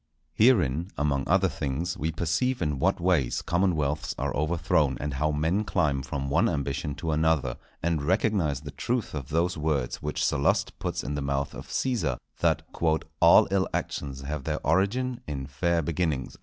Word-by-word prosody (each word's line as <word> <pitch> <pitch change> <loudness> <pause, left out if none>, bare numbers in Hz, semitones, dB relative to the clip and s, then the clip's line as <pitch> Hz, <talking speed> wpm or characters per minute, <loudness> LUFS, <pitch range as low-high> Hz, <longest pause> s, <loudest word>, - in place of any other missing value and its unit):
Herein, 90 - +3
among 70 -2 0
other 95 +2 +4
things, 80 +2 -2
we 80 +3 -2
perceive 85 +11 0
in 75 -5 -1
what - - +2
ways 85 -9 +1
commonwealths 80 -5 0
are - - -2
overthrown, 75 -2 +1
and 75 -2 -3
how 75 +3 0
men 80 +7 +1
climb 75 -9 +1
from 70 +1 -4
one 85 +12 +3
ambition 70 -1 -2
to 80 +2 -3
another; 80 -5 +1 0.3
and 85 -2 +1
recognize 85 -4 +1
the 75 -1 -8
truth 120 - -2
of 70 -4 -5
those 85 +1 0
words 75 -5 -1
which 75 0 -1
Sallust 70 -1 +1
puts - - -3
in 70 - -3
the 75 - -2
mouth 70 0 -1
of - - -9
Cæsar, 120 - -1 0.2
that - - +2
"_all 80 0 +4
ill 95 -1 +2
actions 70 -2 -4
have 70 +1 -4
their - - -3
origin 125 +6 +1
in 70 -3 -4
fair 85 +5 0
beginnings. 80 -4 -1
75 Hz, 170 wpm, -27 LUFS, 70-90 Hz, 0.3 s, other